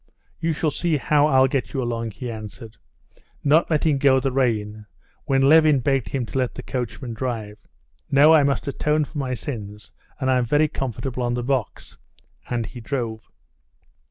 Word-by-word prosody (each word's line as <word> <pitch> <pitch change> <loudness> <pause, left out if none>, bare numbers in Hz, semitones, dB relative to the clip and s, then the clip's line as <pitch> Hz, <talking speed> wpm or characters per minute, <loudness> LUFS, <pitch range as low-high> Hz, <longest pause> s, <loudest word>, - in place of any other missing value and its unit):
You 165 - 0
shall 155 0 0
see 165 0 0
how 145 +2 +3
I'll 130 -3 +5
get 135 0 -2
you 135 - -1
along," 115 -1 -3
he 120 +4 -6
answered, 110 +1 -9 0.7
not 155 +4 +3
letting 155 -2 +1
go 135 -1 +4
the 135 +1 -1
rein, 110 -5 -1 0.4
when 135 0 +2
Levin 155 +1 +6
begged 135 0 0
him 130 -3 -2
to 135 - -3
let 125 -2 -1
the - - -7
coachman 125 0 -4
drive. 110 -3 -4 0.5
"No, 145 +3 +6
I 155 - +6
must 140 0 0
atone 150 +2 0
for 150 +1 -7
my 130 -2 -2
sins, 105 -5 -7 0.3
and 130 -1 +1
I'm 125 -1 +2
very 150 +5 +3
comfortable 130 -2 -4
on 120 0 0
the 120 - -3
box." 130 -3 -3 0.5
And 120 -2 -1
he 120 - -9
drove. 115 -3 -4
130 Hz, 175 wpm, -23 LUFS, 115-145 Hz, 0.7 s, Levin